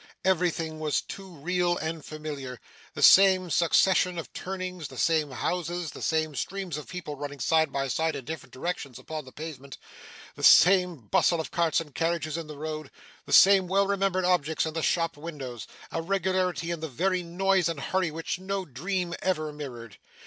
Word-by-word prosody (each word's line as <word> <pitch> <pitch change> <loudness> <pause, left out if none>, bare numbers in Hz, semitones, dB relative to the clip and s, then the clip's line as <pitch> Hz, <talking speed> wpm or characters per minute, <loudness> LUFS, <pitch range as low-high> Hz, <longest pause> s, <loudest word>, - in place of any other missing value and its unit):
Everything 170 -4 0
was 155 -2 +1
too 195 -1 -9
real 175 +2 0
and 160 0 -4
familiar: 145 -5 -7 0.4
the - - -2
same 185 -2 +7
succession 180 +2 +3
of 165 - -7
turnings, 185 -3 -5
the - - -12
same 160 -3 +2
houses, 175 +4 -3
the - - -10
same 155 -1 0
streams 190 +2 -4
of 150 -2 -7
people 180 -5 -6
running 145 0 -7
side 160 +2 +2
by 135 0 -1
side 160 +4 0
in 130 - -6
different 160 +3 -7
directions 140 -4 -4
upon 155 -2 -7
the 130 - -12
pavement, 140 -3 -8 0.6
the - - -11
same 180 -1 +6
bustle 170 - +3
of 160 - -4
carts 170 -2 +2
and 155 -4 -8
carriages 165 -1 -1
in 165 -2 -5
the 150 -1 -9
road, 155 -1 -5 0.4
the - - -8
same 195 -1 +7
well 195 +2 +3
remembered 195 -2 0
objects 160 -4 +1
in 160 - -4
the 165 - -2
shop 165 -1 0
windows: 140 -8 -7 0.2
a 165 - -2
regularity 185 -1 0
in 170 - -3
the 160 - -4
very 185 +7 0
noise 180 +1 +1
and 165 -4 -4
hurry 185 +4 0
which 165 +3 -4
no 190 0 -3
dream 175 +6 -3
ever 155 -5 -1
mirrored. 120 -7 -8
165 Hz, 180 wpm, -27 LUFS, 150-180 Hz, 0.6 s, same